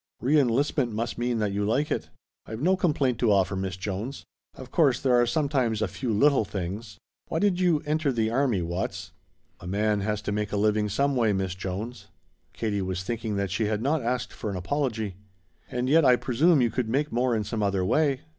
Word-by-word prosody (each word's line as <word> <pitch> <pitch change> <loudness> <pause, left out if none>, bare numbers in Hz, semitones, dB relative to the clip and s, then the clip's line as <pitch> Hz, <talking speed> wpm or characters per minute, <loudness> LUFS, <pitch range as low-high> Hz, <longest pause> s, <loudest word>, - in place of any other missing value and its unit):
"Re 145 +5 +3
enlistment 130 0 +1
must 115 +2 -3
mean 120 0 0
that 105 -2 0
you 100 +1 -1
like 130 +9 0
it." - - -2 0.4
"I've 110 0 -6
no 180 +7 +3
complaint 145 - +1
to 115 -3 +3
offer, 95 -1 +2
Miss 95 -1 -3
Jones. 105 +7 -5 0.3
Of 130 -1 -11
course 140 -7 +3
there 130 -3 +2
are 120 0 +4
sometimes 130 -4 0
a 110 - 0
few 115 +7 -3
little 140 +4 +4
things 100 +2 -5 0.2
" - - -62
"Why - - -2
did 190 0 +2
you 175 -5 +2
enter 150 -1 +1
the 110 -3 0
army, 120 -7 +1
Watts?" 85 +2 -4 0.5
"A 90 - -10
man 105 +2 +1
has 105 +1 -2
to - - -2
make 105 0 -2
a 105 - -1
living 105 0 +2
some 140 +7 +1
way, 115 -4 +2
Miss 95 -2 -1
Jones." 95 +3 -6 0.4
Katie 105 -3 -2
was 95 -1 -3
thinking 110 +1 -3
that 100 -1 -1
she 105 +3 0
had 105 +1 -1
not 145 +3 +1
asked 125 +1 -2
for 110 - -5
an 100 - -3
apology. 110 -2 -2 0.5
"And 125 +1 -2
yet 160 +4 +5
I 125 -2 +6
presume 140 +6 +3
you 120 - +1
could 125 -4 -2
make 145 +5 0
more 120 0 +1
in 110 - 0
some 105 +1 -3
other 100 -2 +1
way. 140 +3 +2
115 Hz, 215 wpm, -26 LUFS, 100-135 Hz, 0.5 s, I